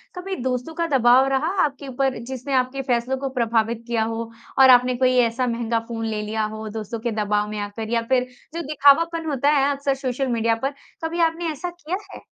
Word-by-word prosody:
कभी 380 +1 -4
दोस्तों 255 +4 -2
का 335 0 -1
दबाव 250 +2 +5
रहा 270 +3 +1 0.2
आपके 280 -1 -3
ऊपर 265 0 -1
जिसने 260 +2 -5
आपके 255 +1 +1
फैसलों 255 0 0
को 270 +1 -3
प्रभावित 230 -2 0
किया 230 -2 +1
हो 225 +1 -4 0.3
और 265 0 +8
आपने 250 0 +6
कोई 255 0 +3
ऐसा 245 +2 -2
महँगा 230 -1 -1
फ़ोन 225 -1 -4
ले 215 -1 -2
लिया 215 +1 -2
हो 220 0 -6
दोस्तों 220 +1 -5
के 235 +1 -2
दबाव 210 0 0
में 215 - -5
आकर 205 +2 -5
या 235 0 +1
फिर 255 -1 +2 0.3
जो 335 - -3
दिखावापन 320 +3 +4
होता 280 0 +1
है 280 -1 +3
अक्सर 280 0 0
सोशल 265 0 -2
मीडिया 230 -2 +1
पर, 270 +5 -3 0.3
कभी 325 +1 -2
आपने 330 0 +1
ऐसा 310 +4 -5
किया 350 0 -5 0.2
है? - - -9
255 Hz, 210 wpm, -23 LUFS, 230-280 Hz, 0.3 s, और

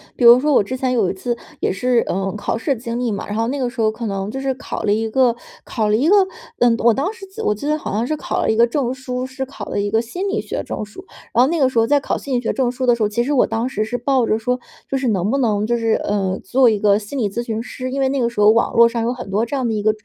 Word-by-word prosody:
比 245 - -3
如 235 +1 +9
说 295 +2 +1
我 235 - +5
之 255 +6 -5
前 255 0 -1
有 215 -7 +2
一 - - -2
次 235 +5 -2 0.2
也 - - 0
是， 245 +4 +1
呃， 195 +1 -2
考 - - -2
试 270 +4 -1
的 - - -11
经 235 0 -4
历 240 -3 -1
嘛， 200 - -4
然 205 - -5
后 225 +1 0
那 275 - -2
个 260 -3 -1
时 235 - -4
候 220 - +3
可 230 +2 -6
能 195 -1 -3
就 265 +5 -5
是 270 0 -1
考 260 - -6
了 205 - +2
一 225 +1 -1
个 245 0 +3 0.3
考 215 -3 -1
了 210 - +3
一 260 +8 +2
个， 395 - +6 0.4
嗯， 240 -1 +4
我 235 0 +4
当 290 - -1
时 445 -3 -11
记 385 0 -21
得 - - -4
我 210 - +2
记 210 - -7
得 305 - +2
好 305 - -5
像 220 +4 0
是 310 - -1
考 - - -3
了 - - +1
一 - - 0
个 235 +1 +5
证 250 0 -1
书， 255 -1 -4
是 260 +1 -5
考 275 - -8
了 - - -3
一 205 - -1
个 220 +2 +2
心 355 +13 -3
理 420 +2 -1
学 - - -4
证 215 - -5
书。 215 - -12 0.3
然 245 - +5
后 260 - +3
那 335 -1 0
个 265 - +4
时 255 -3 +1
候 225 - +3
在 290 +1 +4
考 - - -2
心 270 -2 -3
理 - - -1
学 230 - -1
证 250 -2 0
书 255 0 -3
的 240 - +4
时 235 - -7
候， 210 - +2
其 235 +3 0
实 290 +3 -1
我 260 - +3
当 225 +2 -1
时 255 -5 -2
是 245 +3 -3
抱 255 -1 +1
着 215 - +2
说 250 +3 -1 0.3
就 - - 0
是 265 -1 -1
能 200 -2 0
不 275 - +1
能 210 -5 +1
就 240 +2 +1
是， 225 -1 +1
呃， 195 -2 -1
做 255 -1 +4
一 215 - +1
个 205 0 +3
心 215 +7 -7
理 215 -6 0
咨 235 - -2
询 225 -1 -3
师， 255 +1 -6
因 275 +2 -3
为 265 -1 +2
那 275 - -1
个 235 - +1
时 235 - -7
候 210 +1 +7
网 230 +1 +1
络 235 0 +7
上 235 0 -2
有 235 +2 0
很 245 -6 -7
多 205 +3 +1
这 235 +5 -3
样 260 -3 0
的 225 - -1
一 210 - -1
个， 215 +1 +3
235 Hz, 365 characters per minute, -20 LUFS, 215-260 Hz, 0.4 s, 如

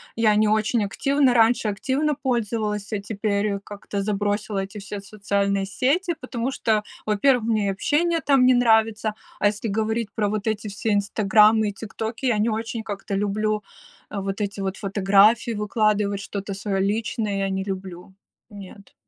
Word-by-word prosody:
я 220 -2 +3
не 215 0 +3
очень 215 +1 +1
активно, 275 +5 +2
раньше 230 -1 +3
активно 275 +9 0
пользовалась, 220 -5 -2
а 205 - 0
теперь 200 0 -1
как-то 200 -1 -5
забросила 205 0 -1
эти 195 +2 -9
все 200 0 -6
социальные 200 -1 -1
сети, 285 - 0
потому 240 +1 -3
что, 220 -5 0 0.2
во-первых, 230 +3 +3
мне 215 -3 +1
общение 325 - +1
там 275 -4 +3
не 255 - +6
нравится, 220 -3 +2 0.2
а 205 - +4
если 210 +1 -2
говорить 220 +1 -1
про 210 -2 0
вот 210 0 -3
эти 215 -1 -2
все 205 +2 -2
"Инстаграмы" 210 +1 +4
и - - -6
"ТикТоки" 220 +4 -5
я 230 -4 +2
не 220 +2 +2
очень 225 +1 -3
как-то 200 -2 -5
люблю 210 +1 -1 0.5
вот 195 0 -4
эти 200 -1 -3
вот 190 0 -3
фотографии 200 +4 +3
выкладывать, 210 -1 0
что-то 200 0 -5
свое 195 0 -2
личное, 210 0 -1
я 195 0 0
не 190 0 -2
люблю, 190 -2 -7 0.4
нет. 200 0 -12
210 Hz, 155 wpm, -23 LUFS, 200-225 Hz, 0.5 s, не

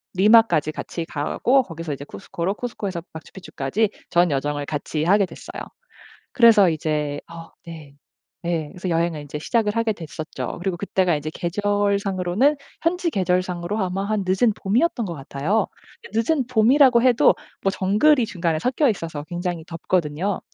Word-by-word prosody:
리마까지 195 -7 +5
같이 165 +2 -5
가고 205 - +1
거기서 165 -4 -6
이제 140 +1 -7
쿠스코로 170 - -4
쿠스코에서 200 -7 -4
마추픽추까지 185 +3 -3 0.2
전 175 -2 +3
여정을 145 +1 -1
같이 150 +1 -3
하게 200 +4 +4
됐어요. - - -9 0.7
그래서 225 -6 +6
이제 150 -2 -2
어 165 0 -10 0.2
네 155 -4 -10 0.5
네 165 -3 -1
그래서 185 +2 -7
여행을 165 -2 0
이제 145 +1 -6
시작을 210 +5 0
하게 230 -1 +1
됐었죠. 160 -1 -6
그리고 185 -3 -1
그때가 185 -3 +1
이제 150 +1 -5
계절상으로는 200 - +1 0.3
현지 350 +1 +1
계절상으로 185 - -1
아마 190 0 -1
한 215 -1 -1
늦은 205 +4 +3
봄이었던 235 +4 +1
것 170 - -5
같아요. 150 +10 -1 0.5
늦은 245 +4 +1
봄이라고 255 +1 +5
해도 245 -1 +5 0.3
뭐 195 - +2
정글이 215 +8 +3
중간에 170 -3 -1
섞여 260 - +1
있어서 165 -7 -4
굉장히 175 -1 -4
덥거든요. 170 +2 -1
185 Hz, 360 characters per minute, -22 LUFS, 160-215 Hz, 0.7 s, 그래서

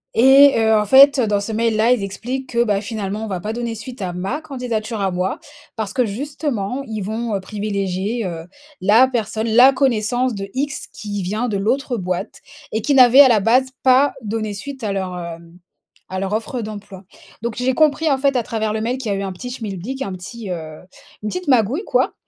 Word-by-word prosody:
et 270 +3 +7
heu, 220 0 +3
en 210 -1 +2
fait, 275 +5 +7
heu, 235 - +2
dans 205 -1 +1
ce 215 - -4
mail 225 0 0
là, 225 +3 +3
ils 245 -5 +2
expliquent 250 +7 -5
que, 235 0 +2
bah, 205 -3 0
finalement 210 -1 -4
on - - -6
va 190 -3 -3
pas 215 +3 -4
donner 235 -1 -3
suite 240 +3 -9
à 185 -2 -2
ma 195 - -3
candidature 240 -6 -4
à 195 -1 0
moi 180 +1 -2 0.4
parce 210 -2 -4
que 250 - +2
justement, 255 0 -3
ils 220 -1 -4
vont, 220 +2 -3
heu, - - -1
privilégier, 200 +2 -3
heu, 165 -2 -5 0.4
la 220 +7 +5
personne, 225 -2 -2
la 245 +4 +7
connaissance 250 -1 +1
de 195 0 -6
X, 280 +1 -3
qui 205 0 -5
vient 215 +7 -2
de 200 - -1
l'autre 245 +6 -1
boîte 180 -2 -4 0.3
et 220 - -1
qui 285 - +1
n'avait 255 +1 +8
à 270 - +7
la 225 - +4
base 250 +5 +3 0.2
pas 260 +2 +4
donné 215 0 -3
suite 265 +4 -7
à 210 - -1
leur, 190 -2 -3
heu, 170 -2 -6 0.7
à 185 - -3
leur 195 +1 -3
offre 230 +3 -2
d'emploi. 205 -3 -8 0.4
Donc 235 -2 -3
j'ai 255 +1 0
compris 310 +1 +3
en 270 - +2
fait 275 -1 +2
à 240 - +1
travers 220 -2 -2
le 220 - -2
mail 245 +3 -1
qu'il 225 -6 -3
y - - 0
a - - -3
eu 200 - -3
un 190 - -3
petit 245 +7 -7
schmilblick, 225 +2 -6
un 200 - -3
petit, 195 +3 -8
heu, 155 -3 -6 0.4
une 210 - -2
petite 360 +3 -5
magouille 255 - +2
quoi - - +1
220 Hz, 220 wpm, -20 LUFS, 200-255 Hz, 0.7 s, n'avait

